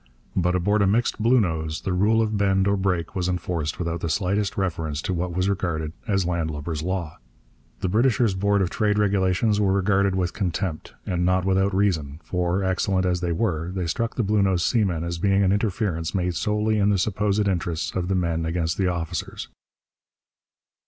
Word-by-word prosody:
But 90 0 +1
aboard 100 +4 +2
a 100 - +3
mixed 115 +3 +1
Bluenose 85 -10 +1
the 95 - -1
rule 110 +5 +3
of 110 -1 -1
bend 95 -1 +2
or 100 - +3
break 90 -4 -1
was 90 -1 -1
enforced 85 -4 -2
without 85 -1 -2
the 85 - -2
slightest 100 +4 0
reference 80 -6 -2
to 95 - -1
what 90 +1 -2
was 90 +1 +1
regarded 85 -6 -2
as 95 -3 +1
landlubber's 80 -2 -2
law. 85 -2 -3 0.6
The - - 0
Britisher's 115 +1 +2
Board 100 +1 +2
of 90 - -2
Trade 105 -1 +1
regulations 100 +1 +2
were 95 -2 +2
regarded 100 0 +2
with 90 -1 -1
contempt; 90 -3 -3
and 90 -1 -1
not 90 +1 +2
without 95 0 +2
reason; 80 -7 0
for, 90 +2 -1
excellent 95 0 +1
as 90 -1 0
they 90 -1 -1
were, 85 -3 -1
they 90 -1 -3
struck 115 +8 -2
the 120 - 0
Bluenose 100 -4 +2
seamen 95 -9 +1
as 85 0 -4
being 100 +2 +3
an 95 - +3
interference 100 -5 -1
made 90 -1 0
solely 105 +4 0
in 100 0 +3
the 100 - +3
supposed 105 +1 0
interests 85 -3 -1
of 90 -1 -1
the 95 - 0
men 85 -2 0
against 80 +1 -1
the 95 - +2
officers. 85 -3 -4
95 Hz, 185 wpm, -24 LUFS, 85-100 Hz, 0.6 s, a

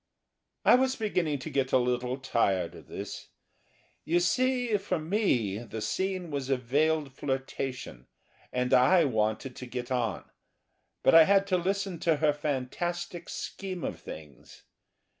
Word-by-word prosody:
I - - +7
was 260 +1 +3
beginning 180 - 0
to 145 +4 -7
get 135 -1 0
a - - +5
little 125 0 0
tired 100 -9 0
of - - -13
this. - - -7 0.8
You 170 +2 +2
see, 245 +4 +1
for 195 -2 -2
me, 155 - 0
the 115 -1 -7
scene 185 - -2
was 140 -2 -3
a 135 - +3
veiled 145 +3 +1
flirtation 130 - -4 0.4
and 125 +1 0
I 140 +7 +6
wanted 110 +1 -1
to 125 - -7
get 125 +1 -5
on. 115 -6 -1 0.8
But - - +5
I 165 -1 +9
had 195 +1 +4
to - - +5
listen 190 0 -2
to 165 -1 +2
her 150 0 +2
fantastic 165 +5 -3
scheme 185 -3 -5
of - - -4
things. 75 -5 -11
145 Hz, 145 wpm, -29 LUFS, 125-180 Hz, 0.8 s, I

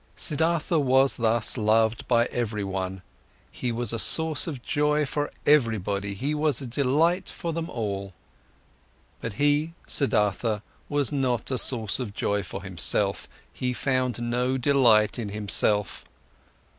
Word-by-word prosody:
Siddhartha 165 +2 0
was 135 -2 +3
thus 115 +1 +2
loved 110 +1 +1
by 120 -1 +3
everyone. 95 -5 -3 0.5
He 125 - -3
was 120 +1 -2
a 115 - -2
source 160 +5 +4
of 135 -7 -6
joy 150 +2 +1
for 145 +1 -3 0.2
everybody, 105 -8 +1
he 140 +9 -2
was 150 -3 0
a 135 - -6
delight 150 +9 +1
for 170 -2 -5
them 165 +1 -4
all. 100 -5 -4 1.1
But 115 - -5
he, 145 +6 +1
Siddhartha, 105 -4 +1 0.3
was 145 -2 0
not 130 -3 -1
a 130 - 0
source 115 -4 +1
of 110 -5 -5
joy 100 0 -1
for 90 - -8
himself, - - 0 0.2
he 125 +6 -2
found 130 -2 -1
no 125 +2 -1
delight 120 -5 +3
in 110 -3 -4
himself. 105 0 0
125 Hz, 135 wpm, -25 LUFS, 105-145 Hz, 1.1 s, source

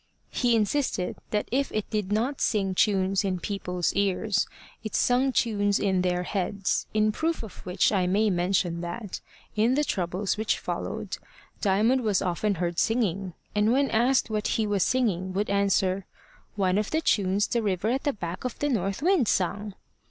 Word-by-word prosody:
He 240 -2 +2
insisted 215 -4 0
that 210 -1 -1
if 275 +3 0
it 215 -1 -2
did 210 -3 -2
not 240 +7 0
sing 195 -4 +1
tunes 195 0 +2
in 185 -2 -1
people's 180 -2 -2
ears, 200 +1 +1 0.4
it 215 - -4
sung 255 +2 +3
tunes 205 -5 +1
in 190 -2 +1
their 180 0 0
heads, 195 +1 -1
in 215 0 +2
proof 320 +5 -1
of 220 - -10
which 180 +1 +2
I 190 -4 +1
may 205 +3 +2
mention 175 -1 0
that, 180 +4 -5 0.3
in 225 +4 +3
the 295 - +2
troubles 185 -3 -1
which 220 0 0
followed, - - -4 0.4
Diamond 220 +6 +3
was 210 -5 +2
often 195 +3 0
heard 175 0 -2
singing; 195 -6 0 0.2
and 210 +2 +2
when 275 +2 +2
asked 245 +4 +3
what 215 -1 0
he 220 - +1
was 205 -2 0
singing, 190 -6 +1
would 200 +2 -1
answer, 195 -1 +1 0.5
"One 190 -1 +2
of 210 - -2
the 315 - 0
tunes 200 -6 +2
the 235 - 0
river 200 0 0
at 260 +3 0
the 290 - +1
back 175 -3 -6
of 250 - -4
the 290 - 0
north 200 -1 -1
wind 350 - +3
sung." 200 +2 -1
205 Hz, 175 wpm, -27 LUFS, 185-225 Hz, 0.5 s, sung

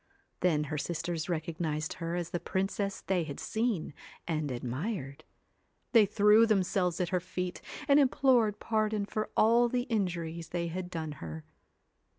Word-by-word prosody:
Then 155 -4 +2
her 150 0 -3
sisters 170 +1 -3
recognised 160 -1 -2
her 165 +1 -2
as 175 -1 -3
the 175 - -1
princess 195 +2 -2
they 185 -3 0
had 145 -3 -6
seen 220 -9 -1 0.3
and 155 -3 -1
admired. 135 - -4 0.7
They 225 -4 +6
threw 210 +2 +5
them 205 -4 +3
selves 180 -1 0
at 180 -2 0
her 185 - +1
feet 180 0 -4 0.3
and 285 0 +6
implored 250 -6 +3
pardon 215 -2 0
for 215 +1 -3
all 235 +2 +5
the 245 0 0
injuries 170 -8 -2
they 170 -1 -2
had 180 +1 -4
done 160 -3 -4
her. 80 -1 -7
180 Hz, 155 wpm, -31 LUFS, 160-215 Hz, 0.7 s, They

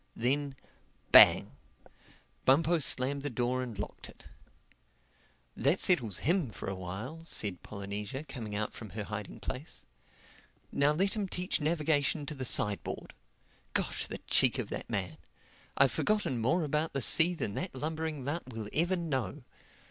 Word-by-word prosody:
Then, 140 +3 0 0.6
bang! - - +8 0.9
Bumpo 160 +5 +4
slammed 140 0 +1
the 145 - -2
door 125 0 0
and 120 -5 -6
locked 105 - -6
it. - - -16 1.3
"That 140 +9 +2
settles 120 - +2
him 170 -4 +2
for 105 - -8
a 95 - -1
while," 100 - -6
said 100 - -3
Polynesia 100 +6 -5
coming 115 -9 -6
out 105 +1 -2
from 110 - -9
her 105 - -2
hiding 105 0 -6
place. 135 +5 -7 0.9
"Now 140 +1 +3
let 190 +6 +1
him 210 -3 -2
teach 180 -2 -2
navigation 150 -1 +1
to 150 - -4
the 130 -3 -5
side 105 -4 +1
board. - - -6 0.6
Gosh, - - -1
the - - -5
cheek - - +2
of - - -3
the - - -4
man! - - -3 0.6
I've 135 -2 +5
forgotten 140 - 0
more 165 +10 +2
about 150 +2 -1
the 135 - -1
sea 175 +3 +6
than 105 -11 -3
that 135 - -4
lumbering 155 -1 -3
lout 145 -2 -4
will 110 -3 -6
ever 175 +4 +2
know. 150 -5 -3
140 Hz, 155 wpm, -31 LUFS, 115-160 Hz, 1.3 s, bang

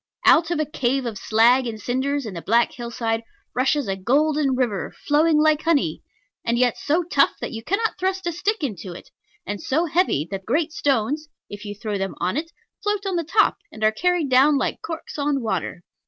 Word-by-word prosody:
Out 330 0 +6
of 345 - -1
a 310 - +1
cave 270 -3 -1
of 220 -4 -4
slag 240 +5 +4
and 220 -2 -5
cinders 265 +4 -1
in 215 - -6
the 170 - -6
black 235 +6 +2
hillside 235 -2 -3 0.3
rushes 265 +1 +1
a 195 - -1
golden 280 +6 +2
river, 240 -6 -1
flowing 305 +2 +4
like 310 0 +3
honey, 325 -4 +1 0.4
and 235 0 0
yet 245 -1 +3
so 320 +5 0
tough 285 -5 +3
that - - -4
you 225 -1 -6
cannot 420 - -1
thrust 375 0 -1
a 345 - 0
stick 400 +3 -1
into 195 - -4
it, 175 - -12 0.3
and 205 0 -4
so 315 +6 +1
heavy 320 - +1
that 195 -1 -4
great 295 - 0
stones 290 +3 0 0.2
(if 205 +1 -8
you 205 0 -5
throw 205 -1 -4
them 195 -1 -3
on 180 +4 -1
it) 325 +3 -3 0.3
float 415 -1 -1
on 385 -2 -1
the 340 - 0
top, 410 +7 +2
and 220 - -8
are 215 - +5
carried 350 +6 +1
down 270 +3 +5
like - - -2
corks 325 -2 -6
on 285 -1 +1
water. 190 - -3
270 Hz, 205 wpm, -23 LUFS, 225-315 Hz, 0.4 s, Out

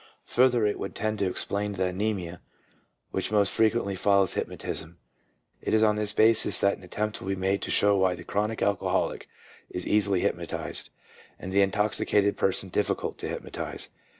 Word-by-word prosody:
Further, 125 -3 +3
it 105 - 0
would 100 - -5
tend 110 0 -2
to 100 -2 +1
explain 100 +2 -2
the 95 -1 0
amnesia 90 -3 -3 0.7
which - - -2
most 100 -3 +3
frequently 110 -3 +1
follows 100 0 +3
hypnotism. 85 +1 -5 0.6
It - - 0
is 110 - +4
on 105 -1 +4
this 105 -1 0
basis 110 +1 +4
that 100 - +3
an - - -18
attempt 105 +4 -3
will - - -7
be 95 - 0
made 95 +1 0
to - - -4
show 100 0 +4
why 95 -1 +2
the - - -10
chronic 105 +2 -1
alcoholic 100 -2 0 0.4
is 90 - -4
easily 100 -3 +2
hypnotized, - - -3 0.5
and 95 - -7
the 100 - +5
intoxicated 100 +1 +2
person 95 0 0
difficult 105 +3 -1
to - - -4
hypnotize. - - -5
100 Hz, 170 wpm, -27 LUFS, 95-105 Hz, 0.7 s, the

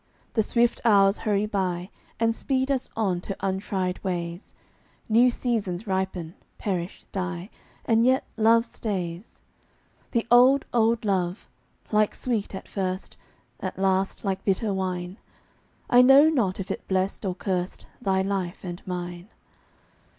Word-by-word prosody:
The 220 - +3
swift 235 +2 +1
hours 200 -3 +5
hurry 210 -1 +1
by 185 -3 -2 0.3
And 230 0 +2
speed 265 +3 0
us 265 -2 -1
on 190 -6 0
to 195 - -5
untried 190 -1 -2
ways; 175 -1 -4 0.5
New 235 +3 +5
seasons 225 -6 -2
ripen, 190 -4 -2 0.2
perish, 180 -3 -3
die, 185 0 -4 0.3
And 230 0 +3
yet 260 +2 +3
love 230 +1 +4
stays. 190 -5 -5 0.7
The 235 -2 0
old, 255 +3 +6
old 230 -1 +2
love 185 -1 -1 0.4
like 215 -1 +2
sweet, 220 -6 -2
at - - -8
first, 185 -1 -3 0.4
At - - -5
last 190 +1 0
like 190 -1 -1
bitter 200 +1 +1
wine 185 0 -3 0.7
I 245 - +6
know 270 +4 +8
not 205 -12 0
if 195 - -4
it - - -6
blest 190 +2 0
or 185 -3 -2
curst 180 -1 -3 0.2
Thy 190 -4 +1
life 190 -2 -3
and 175 -1 -6
mine. 175 +1 -5
195 Hz, 135 wpm, -26 LUFS, 185-225 Hz, 0.7 s, know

